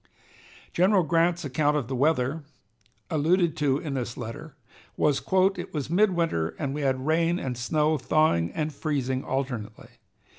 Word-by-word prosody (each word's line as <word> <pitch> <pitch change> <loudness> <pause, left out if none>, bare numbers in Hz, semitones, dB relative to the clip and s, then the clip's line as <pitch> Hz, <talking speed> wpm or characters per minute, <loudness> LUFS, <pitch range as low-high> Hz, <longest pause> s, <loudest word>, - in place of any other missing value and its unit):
General 185 +1 +4
Grant's 170 +1 +1
account 145 +2 +1
of 135 -6 -3
the 130 - -3
weather, 145 +2 +1 0.7
alluded 165 +2 +2
to 140 -3 +2
in 145 -1 -5
this 120 -3 -4
letter, 140 +6 -7 0.4
was: 145 -2 +2 0.3
"It - - -7
was 145 0 -3
midwinter, 170 - +1
and 140 -3 -3
we 150 - -3
had 130 -1 0
rain 165 +2 +2
and 130 -7 -3
snow, 150 +5 +1
thawing 125 - +2
and 155 -1 -2
freezing 135 -3 -2
alternately. 125 -5 -4
150 Hz, 145 wpm, -26 LUFS, 130-160 Hz, 0.7 s, General